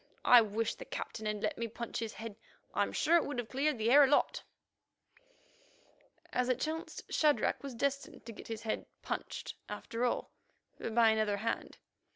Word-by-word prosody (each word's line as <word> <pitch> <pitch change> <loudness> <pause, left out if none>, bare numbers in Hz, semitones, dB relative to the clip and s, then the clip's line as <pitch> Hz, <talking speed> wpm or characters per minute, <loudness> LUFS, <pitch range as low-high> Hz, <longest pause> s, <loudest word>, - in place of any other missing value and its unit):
I 245 -1 +9
wish 220 +1 -1
the - - -10
Captain 220 -1 -5
had 210 -1 -2
let 310 - -1
me 230 - -1
punch 235 +1 -5
his 225 -1 -3
head. 225 -2 -7 0.4
I'm - - +1
sure 340 +2 +4
it 335 - +2
would 285 -2 -4
have 245 -2 -3
cleared 280 +1 +1
the 225 +2 +1
air 290 +2 +9
a - - +6
lot." 290 - +2 1.9
As 250 0 +1
it 255 -1 +2
chanced, 320 +3 -3
Shadrach 300 -2 +3
was 275 -3 -6
destined 275 +1 -2
to 230 - -6
get - - -11
his 225 -1 -5
head 220 - -2 0.2
"punched" - - -4 0.2
after 230 +3 -4
all, 245 - 0 0.5
but 225 - -4
by 230 -1 +7
another 215 -2 +1
hand. 225 +3 -3
235 Hz, 185 wpm, -33 LUFS, 220-275 Hz, 1.9 s, I